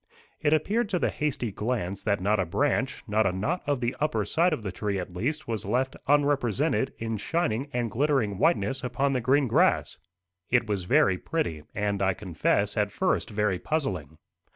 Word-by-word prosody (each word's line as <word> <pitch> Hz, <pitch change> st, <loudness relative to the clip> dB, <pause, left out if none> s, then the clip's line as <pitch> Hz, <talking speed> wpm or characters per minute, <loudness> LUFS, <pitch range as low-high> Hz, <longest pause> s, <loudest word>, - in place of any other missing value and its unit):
It 150 Hz, -, +1 dB
appeared 205 Hz, +9 st, +1 dB
to 185 Hz, -, +1 dB
the -, -, 0 dB
hasty 135 Hz, -7 st, -2 dB
glance 100 Hz, -3 st, -3 dB
that 100 Hz, -2 st, +1 dB
not 105 Hz, +3 st, +1 dB
a 95 Hz, -, +1 dB
branch 135 Hz, -, 0 dB
not 110 Hz, 0 st, +2 dB
a -, -, +1 dB
knot 140 Hz, -, -1 dB
of 145 Hz, -3 st, 0 dB
the 120 Hz, +1 st, -1 dB
upper 150 Hz, +1 st, 0 dB
side 170 Hz, +3 st, +2 dB
of 150 Hz, -8 st, -2 dB
the 95 Hz, -, -3 dB
tree 100 Hz, +1 st, -2 dB
at 90 Hz, -1 st, -5 dB
least 145 Hz, +11 st, -2 dB
was 110 Hz, -3 st, -2 dB
left 125 Hz, +6 st, 0 dB
unrepresented 140 Hz, -1 st, +2 dB
in 115 Hz, -1 st, -3 dB
shining 135 Hz, -, -1 dB
and 120 Hz, -4 st, -1 dB
glittering 125 Hz, -6 st, +1 dB
whiteness 140 Hz, -5 st, +1 dB
upon 135 Hz, +3 st, 0 dB
the 130 Hz, -, 0 dB
green 135 Hz, +3 st, +3 dB
grass. 115 Hz, -, +2 dB, 0.5 s
It 120 Hz, -1 st, +3 dB
was 100 Hz, -4 st, -2 dB
very 90 Hz, 0 st, +3 dB
pretty, 80 Hz, -, -2 dB
and, 100 Hz, -1 st, -1 dB
I 95 Hz, -1 st, +2 dB
confess, 100 Hz, +3 st, 0 dB
at 105 Hz, -1 st, +1 dB
first, 185 Hz, -1 st, 0 dB
very 105 Hz, -4 st, 0 dB
puzzling. 90 Hz, -, -2 dB
120 Hz, 185 wpm, -27 LUFS, 100-145 Hz, 0.5 s, green